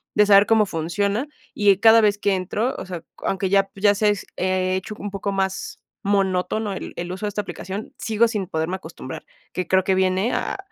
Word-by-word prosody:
de 210 - +5
saber 200 0 +7
cómo 220 -2 +4
funciona, 200 - -1 0.3
y, 205 -1 +5
eh, 195 - +1
cada 225 0 +8
vez 205 -1 +3
que 200 -2 +2
entro, 210 +7 -1
o - - -6
sea, 180 -3 -6 0.2
aunque 190 -1 -1
ya, 195 0 +3
pues, 195 - -14
ya 205 -1 +5
sé, 210 +2 +2
se 210 - +5
s 205 - -8
eh, 185 0 0
hecho 190 +3 -6
un 205 - -4
poco 200 0 -3
más 190 0 -2 0.2
monótono 195 +1 0
el - - -7
el 175 +1 -4
uso 190 +3 -4
de - - -1
esta 210 +1 -2
aplicación, 195 0 -7
sigo 225 0 +2
sin 210 -4 -2
poderme 160 +3 -2
acostumbrar, 160 -7 -9 0.3
que 185 - -3
creo 190 0 +3
que 190 0 +2
viene, 190 +4 +1
ah, - - -2
195 Hz, 225 wpm, -22 LUFS, 185-210 Hz, 0.3 s, cada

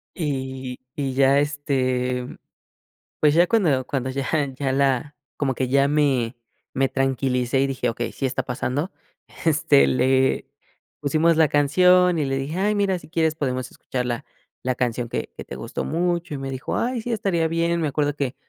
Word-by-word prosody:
Y 130 -5 -4 0.2
y 135 -2 -2
ya 135 +1 +4
este, 130 -4 -1 0.9
pues 150 -1 +4
ya 170 +2 +5
cuando 160 - +2
cuando 130 -1 -2
ya 135 +1 -3 0.3
ya 135 -1 0
la 135 +1 +1 0.2
como 135 -2 0
que 130 +1 -1
ya 140 +2 +3
me 140 -5 +1 0.4
me 135 0 +2
tranquilicé 130 -1 0
y 135 - +2
dije: 135 -1 -1
"Okey, 120 +1 -3
sí 135 - -3
está 130 0 -1
pasando", 130 +7 -2 0.5
este, 150 -3 +4
le 130 +1 +2 0.6
pusimos 155 +3 +3
la 160 -2 +5
canción 180 +5 +4
y 150 - 0
le 135 0 -1
dije: 140 +5 -3
"Ay 205 +2 +2
mira, 200 -2 +1
si - - -15
quieres 160 -2 +1
podemos 130 -4 -2
escuchar 125 -1 -4
la 120 -1 -2 0.4
la 130 0 0
canción 120 -1 -1
que - - -3
que - - -7
te - - -8
gustó - - -4
mucho". 175 +1 -1
Y - - -3
me 135 0 -5
dijo: 130 0 -3
"Ay, 245 0 -1
sí, 240 - -4
estaría 190 -7 +1
bien". 170 +1 0
Me 155 - 0
acuerdo 145 +1 0
que, 135 -3 -2
140 Hz, 180 wpm, -23 LUFS, 130-160 Hz, 0.9 s, ya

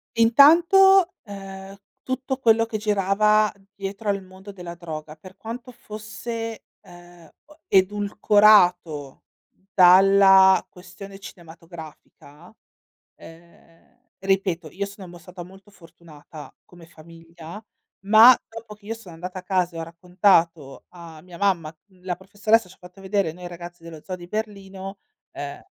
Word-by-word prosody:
Intanto, 340 +10 +5
ehm, 195 -2 -10 0.3
tutto 260 0 -4
quello 230 -3 +2
che 225 -1 -5
girava 210 +1 +1 0.2
dietro 200 +2 -6
al 200 -1 -2
mondo 190 +2 -13
della 175 -3 -9
droga, 155 -3 -9
per 185 +4 -16
quanto 235 +3 -9
fosse, 225 0 -8 0.2
ehm, 175 -2 -17 0.2
o 300 +1 -21
edulcorato 195 -6 +2 0.5
dalla 190 +1 +6
questione 195 +2 -13
cinematografica 165 -2 -14 0.6
ehm, 165 +3 -19 0.2
ripeto, 190 -4 -1
io 200 +2 -4
sono 200 -1 -12
mo 175 0 -13
stata 180 +1 -11
molto 190 +3 -17
fortunata 165 -4 -15
come 175 -2 -17
famiglia, 165 +3 -14 0.4
ma 225 +4 +7
dopo 225 -1 -11
che 210 -1 -25
io 225 - -4
sono 200 -7 -14
andata 180 +3 -8
a - - -13
casa 180 -2 -1
e - - -6
ho - - -4
raccontato 170 -3 0
a 170 -3 -13
mia 180 0 -14
mamma, 170 -6 -1
mhmm, 185 -3 -27
la 180 -1 -3
professoressa 205 +3 0
ci 185 - -17
ha - - -36
fatto 180 +2 -16
vedere 195 -3 -1
noi 175 +2 -10
ragazzi 175 0 -11
dello 165 -2 -11
Zoo 185 - -6
di 175 -1 -13
Berlino, 195 -2 -7 0.3
ehm, 145 0 -8
190 Hz, 135 wpm, -22 LUFS, 170-210 Hz, 0.6 s, ma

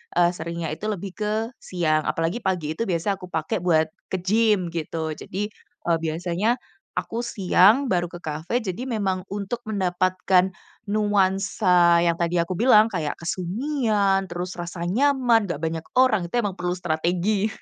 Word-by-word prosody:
eee, 175 0 +4
seringnya 170 0 -4
itu 210 - -8
lebih 195 -1 -5
ke 210 -1 -2 0.3
siang. 155 -4 0
Apalagi 165 +8 -1
pagi 170 -5 -1
itu 230 - -1
biasa 185 +2 0
aku 180 - -9
pakai 160 +2 -1
buat 160 -3 +3 0.2
ke - - 0
gym, 210 -2 +2
gitu. 160 0 -3
Jadi, 200 +6 -4 0.4
eee, 170 -1 +3
biasanya 175 +8 0 0.4
aku 235 +1 -3
siang 210 +4 +4
baru 175 -4 0
ke 175 - -8
cafe, 160 +8 -2
jadi 205 0 -4
memang 200 -7 -1
untuk 205 +4 -4
mendapatkan 185 -2 +1 0.4
nuansa 195 -4 +3
yang 170 -1 +1
tadi 170 0 0
aku 170 +1 +1
bilang, 225 -2 +6
kayak 160 -6 -2
kesunyian, 200 - 0
terus 175 +1 -5
rasa 170 0 -5
nyaman, 240 +2 +3
nggak 170 -4 -4
banyak 160 0 -2
orang. 240 -8 +4
Itu 175 - -6
emang 200 -2 -3
perlu 180 0 -1
strategi. 180 +5 0
185 Hz, 155 wpm, -24 LUFS, 170-210 Hz, 0.4 s, bilang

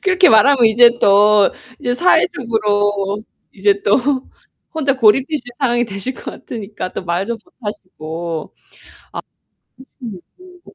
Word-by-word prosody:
그렇게 370 -1 +4
말하면 250 +3 +5
이제 240 +2 +5
또 205 0 +4 0.3
이제 245 - -2
사회적으로 210 - 0 0.3
이제 200 0 0
또 200 - +3 0.8
혼자 285 -4 0
고립되실 260 +4 +2
상황이 240 -3 +1
되실 215 +4 -6
것 - - -14
같으니까 210 -4 -7
또 - - -6
말도 180 +6 -2
못 360 - -30
하시고. 170 -6 -7 1.5
아. - - -6
혹시 355 - -13
못 - - -17
220 Hz, 255 characters per minute, -17 LUFS, 200-260 Hz, 1.5 s, 말하면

